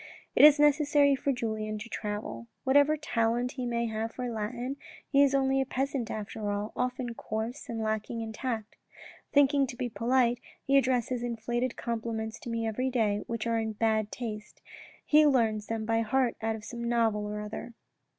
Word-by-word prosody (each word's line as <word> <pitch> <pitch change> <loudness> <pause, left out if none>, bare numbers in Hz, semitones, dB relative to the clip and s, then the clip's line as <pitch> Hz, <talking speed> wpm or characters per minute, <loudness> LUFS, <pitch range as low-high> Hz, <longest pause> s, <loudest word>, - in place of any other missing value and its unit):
"It - - +6
is 300 0 +10
necessary 290 -1 +4
for 275 +1 0
Julien 220 -3 -2
to 215 +2 -7
travel. 205 - -5 0.2
Whatever 285 +3 +4
talent 240 -3 0
he 255 -2 -4
may 235 0 0
have 220 0 -3
for 250 -1 -3
Latin, 240 +5 -3 0.3
he 280 0 +4
is 280 -1 +4
only 270 0 +2
a - - 0
peasant 270 -2 -2
after 210 0 -4
all, 205 +1 -3
often 250 -1 -2
coarse 225 +4 -5
and 225 -1 -3
lacking 220 +1 -2
in 220 -1 -5
tact. 225 -3 -4 0.5
Thinking 280 -1 +4
to 245 - -7
be 250 -2 -2
polite, 240 +1 +2 0.3
he 275 - +2
addresses 255 -2 +2
inflated 240 +1 -2
compliments 225 -1 -3
to - - -8
me 230 -1 -1
every 250 +4 -1
day, 215 -5 +1
which 230 -1 -3
are 230 -1 +1
in 220 -1 -2
bad 220 -1 +1
taste. 215 -3 -7 0.4
He 305 0 +6
learns 225 -6 +2
them 225 -1 -2
by 225 0 +2
heart 250 +2 +1
out 225 0 0
of 215 -1 -9
some 235 0 -6
novel 225 -3 +1
or 210 0 -4
other." 215 +2 -7
235 Hz, 180 wpm, -29 LUFS, 220-260 Hz, 0.5 s, is